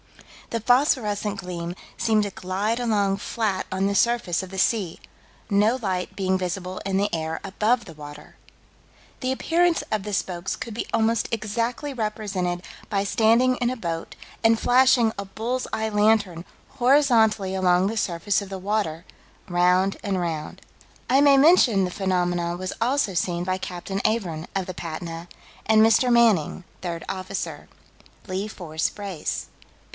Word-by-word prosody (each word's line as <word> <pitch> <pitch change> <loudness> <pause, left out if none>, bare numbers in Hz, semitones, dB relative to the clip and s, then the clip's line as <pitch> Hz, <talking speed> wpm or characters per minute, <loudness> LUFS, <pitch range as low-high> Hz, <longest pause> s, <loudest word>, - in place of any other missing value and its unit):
The 230 - -2
phosphorescent 215 -4 +2
gleam 175 -1 -5 0.2
seemed 220 -2 +2
to 205 - -3
glide 195 +6 -2
along 205 -5 +1
flat 205 -2 -2
on 190 +1 0
the 200 - +1
surface 235 -7 +2
of 190 - -8
the 190 - -8
sea, 190 -3 0 0.5
no 210 +3 +3
light 190 -6 -3
being 190 -1 +1
visible 185 0 -4
in 195 -1 0
the 200 +1 +2
air 160 -1 -2
above 215 +4 0
the 165 - -10
water. 150 0 -11 0.9
The 255 0 0
appearance 335 +5 +2
of 215 -2 0
the 210 - -5
spokes 180 -2 -2
could 230 - -6
be 225 - -4
almost 225 +1 +1
exactly 230 +6 -2
represented 205 -6 -2 0.3
by 200 -2 0
standing 235 +4 +3
in 240 - 0
a 255 - -3
boat 165 -5 -4 0.3
and 225 0 +4
flashing 245 -3 +4
a 200 - -3
bull's 230 +6 -3
eye 220 0 -1
lantern 210 -5 +2 0.4
horizontally 235 -7 +4
along 180 -1 +3
the 220 - -2
surface 195 0 0
of 200 - -8
the 195 - -5
water, 185 -4 -2 0.4
round 180 +2 +2
and 195 -2 -1
round. 165 -3 -4 0.5
I 265 +3 +5
may 285 -1 +6
mention 270 - +5
that 180 - -4
the - - -10
phenomenon 175 -3 0
was 185 +1 -4
also 250 -3 +1
seen 175 0 -1
by 185 0 -1
Captain 185 +2 -5
Avern, 180 -8 -1
of 190 -2 0
the 185 - -6
Patna, 165 0 -6 0.4
and 220 0 +5
Mr. 245 +3 +4
Manning, 220 -8 +3 0.2
third 170 -2 -4
officer. 185 -1 -5 0.6
"Lee 190 +2 -2
Fore 165 -7 -10 0.2
Brace. 195 -6 -4
200 Hz, 155 wpm, -24 LUFS, 180-225 Hz, 0.9 s, may